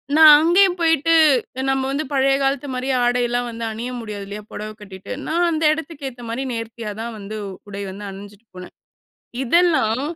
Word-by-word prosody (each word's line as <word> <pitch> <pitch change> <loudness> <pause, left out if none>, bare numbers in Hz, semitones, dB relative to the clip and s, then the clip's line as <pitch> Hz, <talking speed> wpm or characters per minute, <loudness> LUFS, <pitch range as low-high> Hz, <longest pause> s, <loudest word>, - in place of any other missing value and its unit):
நான் 310 -1 +9
அங்கேயும் 355 +3 +4
போயிட்டு, 330 -1 +3 0.6
நம்ம 270 0 +1
வந்து 285 +3 -1
பழைய 270 0 +3
காலத்து 275 +1 0
மாரி 255 +1 -3
ஆடைலாம் 245 0 +1
வந்து 230 0 -7
அணிய 225 +3 -5
முடியாது 210 -3 -6
இல்லையா? 205 +1 -7
பொடவை 215 0 -6
கட்டிட்டு. 195 -2 -10 0.2
நான் 345 +2 +1
அந்த 320 -1 -1
இடத்துக்கு 310 -2 -5
ஏத்த 245 -1 -13
மாரி 235 +4 -3
நேர்த்தியா 230 -1 -5
தான் 235 +1 -4
வந்து, 210 +1 -7 0.3
உடை 200 0 -6
வந்து 200 +2 -8
அணிஞ்சிட்டு 200 +3 -12
போனேன். 180 0 -10 0.7
இதெல்லாம், 270 -5 +2
245 Hz, 165 wpm, -21 LUFS, 215-305 Hz, 0.7 s, நான்